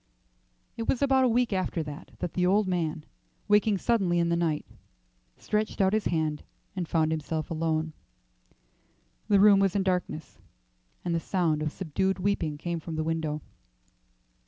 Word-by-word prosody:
It 230 - -3
was 270 - +1
about 265 -1 +4
a - - +3
week 240 -1 +2
after 185 -3 -1
that 150 +2 -8 0.2
the 180 - 0
old 195 +3 +3
man, 160 -4 -1 0.4
waking 210 0 +4
suddenly 190 -5 +1
in 170 0 +2
the 170 - +2
night, 165 -3 0 0.7
stretched 215 0 -2
out 190 0 +3
his 215 -1 +1
hand 155 -3 0 0.3
and 180 -3 -3
found 160 -1 +1
himself 155 0 -3
alone. 160 -1 -1 1.3
The 200 - +4
room 200 0 +7
was 195 -1 +2
in 200 - +2
darkness, 180 -6 -2 0.7
and 175 - 0
the 165 - +1
sound 165 -4 0
of 155 -1 -1
subdued 190 +3 -1
weeping 180 -6 -1
came 170 +2 -3
from 160 0 -6
the 155 - -1
window. 155 -2 -2
175 Hz, 155 wpm, -28 LUFS, 160-200 Hz, 1.3 s, room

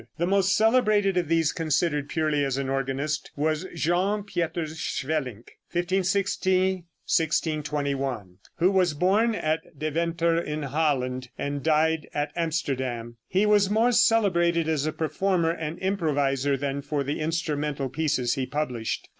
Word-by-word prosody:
The 170 - +1
most 195 0 +2
celebrated 215 -4 +3
of 175 -3 +1
these, 165 -1 +2
considered 155 -2 0
purely 155 -3 +1
as 135 -1 -1
an 135 -1 -2
organist, 135 +3 -2
was 155 +4 -1
Jean 180 +6 +1
Pieters 165 -4 -3
Swelinck 130 -6 -3
(1560 185 0 +1 0.2
1621), 140 - -1 0.2
who 180 +3 +3
was 180 -5 +2
born 205 +8 +2
at 155 -3 -2
Deventer 165 +2 0
in 150 -2 -4
Holland, 130 -4 -1
and 140 0 -3
died 160 +1 +1
at 145 0 -1
Amsterdam. 130 -8 -2
He 190 +3 +2
was 205 -2 +4
more 225 +4 +3
celebrated 175 -8 +3
as 155 -2 0
a - - 0
performer 170 +2 0
and 165 -1 -4
improviser 145 -7 0
than 140 +1 -2
for 145 0 -2
the 145 +2 -3
instrumental 150 -3 -1
pieces 130 -3 0
he 130 -3 -2
published. 125 -5 -3
155 Hz, 135 wpm, -26 LUFS, 140-180 Hz, 0.2 s, was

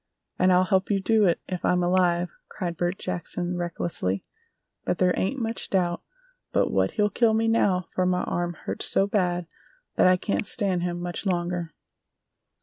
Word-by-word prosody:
"And 185 +1 +4
I'll 180 0 +5
help 190 0 +1
you 200 -2 +2
do 215 +2 +3
it, 170 - +1
if 185 -2 -4
I'm 180 0 +2
alive!" 175 -1 +2 0.2
cried 175 -4 -4
Bert 175 +3 -1
Jackson, 175 0 -3
recklessly; 170 - -2 0.6
"but - - -1
there 180 -1 +3
ain't 260 +9 -1
much 225 -1 -3
doubt 175 -3 0 0.5
but - - +1
what - - +1
he'll 210 -2 +1
kill 225 +1 +3
me 225 +1 +1
now 195 -5 +2
for 185 0 0
my 180 0 +1
arm 175 0 -2
hurts - - -1
so 195 - +3
bad 180 -4 0 0.5
that - - +6
I 185 0 +5
can't 200 +2 -2
stand 200 -8 +1
him 175 0 -2
much 175 +3 -3
longer!" 175 -2 -2
180 Hz, 175 wpm, -26 LUFS, 175-195 Hz, 0.6 s, that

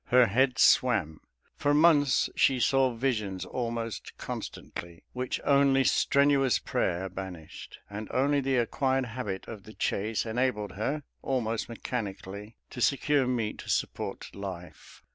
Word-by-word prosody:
Her 125 0 +5
head 130 +5 +2
swam; 95 -12 +3 0.3
for 145 0 +1
months 150 -4 +4
she 130 -2 +3
saw 130 -1 +3
visions 110 -7 -1
almost 115 -3 -4
constantly, 85 -1 -7
which 125 0 -2
only 140 -1 +4
strenuous 140 -4 +3
prayer 90 +2 -1
banished, 95 -4 -8
and 105 +1 -6
only 140 +2 +2
the 135 -1 +1
acquired 130 +2 +1
habit 115 -5 -5
of 110 -3 -8
the 110 - -13
chase 110 +3 -1
enabled 110 -3 -1
her, 135 +10 -2 0.2
almost 115 -4 -1
mechanically, 105 -2 -5 0.2
to 125 - -6
secure 140 0 +2
meat 115 -4 -1
to - - -9
support - - -2
life. 90 -5 -9
120 Hz, 130 wpm, -28 LUFS, 100-135 Hz, 0.3 s, Her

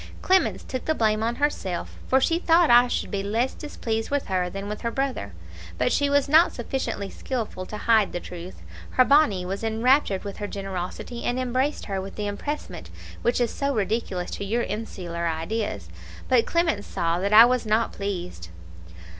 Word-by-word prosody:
Clemence 375 0 +2
took 255 - -5
the 315 - +1
blame 215 -3 +1
on 230 +2 0
herself, 240 -11 -2
for 265 - +4
she 330 +5 +2
thought 335 -4 +4
I 240 +1 +7
should - - -2
be 200 -2 -1
less 225 +6 0
displeased 225 -7 -4
with 285 -1 0
her 180 -1 0
than 195 +2 -6
with 210 0 -5
her 235 - -1
brother; 255 - -3 0.4
but - - +1
she 285 0 +2
was 285 0 +3
not 320 +4 +6
sufficiently 240 -4 -3
skilful 215 -5 -5
to 210 - -6
hide 220 -2 +3
the 175 - -3
truth. 175 +1 -9 0.3
Her 255 - +4
BONNE 265 -11 +4
was 195 +4 -4
enraptured 225 -2 +2
with 200 -1 -6
her 205 - -4
generosity, 195 +4 -5
and 245 +1 -1
embraced 255 +3 -1
her 195 -2 -3
with 195 +1 -8
the 210 - -3
EMPRESSEMENT 285 +9 -5 0.3
which 240 +1 +1
is 240 -2 +1
so 280 -1 -1
ridiculous 200 -4 -2
to - - -4
your 230 +4 0
insular 180 -5 -4
ideas; 165 +7 -3 0.4
but 250 -3 +3
Clemence 325 -12 0
saw 170 +1 -1
that 200 +2 -1
I 220 +2 +10
was 245 -2 0
not 220 +2 +1
pleased. 180 - -5
225 Hz, 185 wpm, -25 LUFS, 195-260 Hz, 0.4 s, I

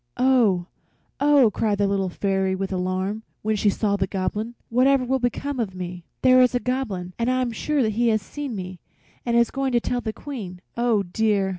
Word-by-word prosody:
"Oh, 235 -9 +3 0.5
oh!" 285 -6 +5
cried 210 -2 0
the 205 - +2
Little 195 -1 0
Fairy, 190 0 0
with 195 0 -3
alarm, 185 +3 -2 0.2
when 215 0 +1
she 205 0 +2
saw 200 0 0
the 190 -1 0
Goblin, 210 +5 -3
"whatever 255 +2 +3
will 265 +2 +1
become 260 +3 -2
of 200 -5 -2
me? 180 -1 -6 0.2
There 255 0 +7
is 250 0 +3
a - - +3
Goblin, 215 -9 -3
and 235 +1 +1
I 255 0 +1
am 240 - -2
sure 270 +2 0
he 230 +3 +1
has 220 -1 +3
seen 285 -2 -5
me 185 -2 -6 0.5
and 235 0 +2
is 235 -1 +3
going 270 -1 -1
to 240 - +4
tell 245 +1 -2
the 220 - -3
Queen. 215 -9 -7 0.2
Oh 235 -4 +2
dear! 200 +1 +1
220 Hz, 200 wpm, -24 LUFS, 190-250 Hz, 0.5 s, There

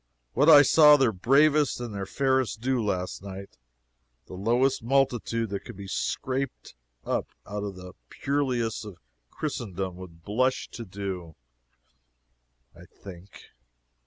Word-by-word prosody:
What 145 +6 +4
I 145 -2 +10
saw 150 +1 +7
their 130 -5 +3
bravest 140 +9 +3
and 120 -3 -6
their 100 -1 -5
fairest 130 -2 0
do 125 0 0
last 90 -4 -3
night, 100 -4 -10 0.7
the - - -12
lowest 120 +8 +1
multitude 120 -3 0
that 100 - -2
could 120 - -10
be 100 -1 -8
scraped 130 +7 -3 0.3
up - - -1 0.2
out 105 0 -5
of 100 -2 -5
the 90 0 -11 0.2
purlieus 130 -6 -1
of 105 -5 -10 0.3
Christendom 95 - -4
would 85 -3 -12
blush 130 +7 0
to 115 - -8
do, 95 -4 -6 1.4
I 85 +1 -14
think. 95 +1 -14
115 Hz, 130 wpm, -26 LUFS, 95-130 Hz, 1.4 s, I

